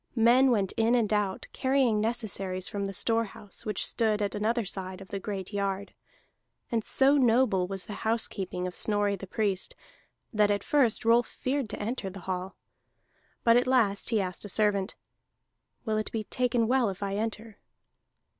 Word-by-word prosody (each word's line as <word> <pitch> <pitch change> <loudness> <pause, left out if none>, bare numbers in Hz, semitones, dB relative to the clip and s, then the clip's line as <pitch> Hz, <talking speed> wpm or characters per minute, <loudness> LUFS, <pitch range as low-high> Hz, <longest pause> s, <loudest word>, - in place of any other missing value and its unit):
Men 245 +3 +5
went 205 -6 +2
in 225 +2 +3
and 220 -3 +1
out, 205 -2 -1
carrying 260 -5 +2
necessaries 195 -5 -2
from 200 -1 -3
the 195 - -3
storehouse 225 -1 -2
which 210 -3 0
stood 220 -3 +1
at 205 -1 -1
another 220 +2 0
side 185 -1 -4
of 195 - -12
the 200 - -4
great 195 0 -5
yard. 200 0 -2 0.8
And 230 -2 0
so 275 +5 +4
noble 235 -7 +3
was 195 -1 -4
the 210 - -7
housekeeping 200 -5 -1
of 180 - -4
Snorri 205 0 +1
the 195 0 -9
Priest, 195 -2 -1 0.6
that 210 -1 +3
at 205 -1 0
first 245 -6 +2
Rolf 235 +1 +4
feared 260 -3 -2
to - - -5
enter 215 -2 -3
the 190 0 -10
hall. 185 +1 -4 0.9
But 230 0 +6
at 245 - +2
last 225 -6 +2
he 225 -2 +2
asked 185 -2 -4
a 205 - -7
servant: 205 0 +1 0.9
"Will 215 -2 0
it 215 - -3
be 220 -1 -2
taken 240 0 0
well 250 -2 +2
if 190 +1 -6
I 195 0 -2
enter?" 220 0 -4
215 Hz, 175 wpm, -28 LUFS, 195-230 Hz, 0.9 s, But